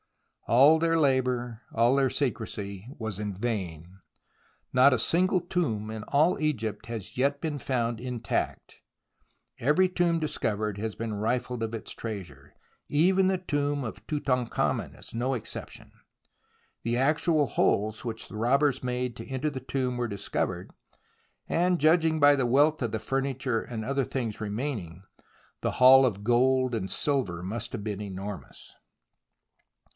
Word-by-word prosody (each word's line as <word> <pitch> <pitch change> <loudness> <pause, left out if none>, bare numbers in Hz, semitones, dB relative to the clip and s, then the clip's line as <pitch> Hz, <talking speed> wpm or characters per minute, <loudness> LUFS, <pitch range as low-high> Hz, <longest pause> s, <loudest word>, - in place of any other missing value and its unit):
All 140 +7 +6
their 165 0 +2
labour, 125 -4 +1
all 120 +3 +4
their 135 -1 +3
secrecy, 105 -7 -3
was 110 -4 -4
in 105 -1 -2
vain. 95 -5 -4 0.7
Not 130 +2 +6
a 125 - +1
single 185 - +2
tomb 155 - -2
in 110 -1 -6
all 155 +5 +3
Egypt 130 -7 -2
has 115 -3 -6
yet 140 +2 +1
been 155 -2 -3
found 120 -3 -1
intact. 125 -2 -3 0.8
Every 150 +9 +3
tomb 175 -2 +1
discovered 110 -9 -2
has 110 0 -3
been 115 -1 -4
rifled 120 +3 -1
of 110 0 -3
its 110 - -7
treasure. 85 - -7 0.4
Even 185 +5 +3
the 190 0 +2
tomb 145 -5 -1
of 110 - -7
Tutankhamen 130 -5 -1
is - - -13
no 125 +3 0
exception. 115 - -8 0.9
The 120 +1 0
actual 150 +3 +2
holes 110 -4 +1
which 115 -2 -5
the - - -10
robbers 130 +4 +2
made 125 -1 -2
to - - -8
enter 135 +3 -2
the 130 -2 -6
tomb 130 -1 -2
were 120 0 -1
discovered, 100 -3 -3 0.8
and, 180 +1 +2
judging 160 0 +3
by 145 0 +7
the 130 -3 +1
wealth 145 +5 +3
of 120 -3 -1
the 110 - -2
furniture 135 0 -1
and 110 -3 -6
other 140 +1 0
things 115 -4 -4
remaining, 105 - -4 0.6
the - - -1
haul 130 +1 +8
of 100 -5 -1
gold 130 +1 +3
and 95 -4 -3
silver 120 - -1
must 115 +5 -4
have 110 -4 -5
been 105 -2 -3
enormous. 100 0 -7
125 Hz, 145 wpm, -28 LUFS, 110-145 Hz, 0.9 s, haul